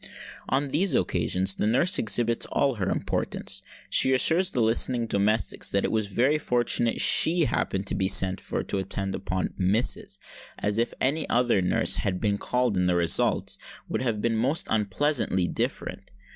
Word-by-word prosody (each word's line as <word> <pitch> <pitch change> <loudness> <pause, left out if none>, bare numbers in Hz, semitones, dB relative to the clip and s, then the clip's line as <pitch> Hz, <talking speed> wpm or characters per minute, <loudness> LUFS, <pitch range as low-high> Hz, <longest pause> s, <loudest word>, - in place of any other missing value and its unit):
On 135 +2 -1
these 155 +2 0
occasions 90 +1 0
the 105 - -2
nurse 170 - +2
exhibits 115 +1 +1
all 140 -1 0
her 95 -5 -3
importance. 95 0 -1 0.3
She 130 - +3
assures 170 +7 +3
the 130 - -3
listening 120 +1 +2
domestics 105 -1 0
that 100 - 0
it - - -1
was 110 -2 -1
very 130 +9 0
fortunate 120 -3 0
she 170 +2 +5
happened 95 -5 -2
to - - 0
be 95 - 0
sent 95 0 +3
for - - -4
to 100 - -3
attend 95 0 -4
upon 95 -1 -4
"missus," 100 +6 -1 0.4
as 105 +2 -1
if 120 - 0
any 150 +5 0
other 120 -4 +1
nurse 90 - +2
had 90 -2 -2
been 100 -2 -1
called 125 -4 -1
in 90 - +1
the 90 0 +1
results 85 -1 +1 0.3
would - - -3
have 115 -5 -2
been 115 -1 0
most 135 +9 +1
unpleasantly 105 -3 0
different. - - -4
110 Hz, 170 wpm, -25 LUFS, 95-130 Hz, 0.4 s, she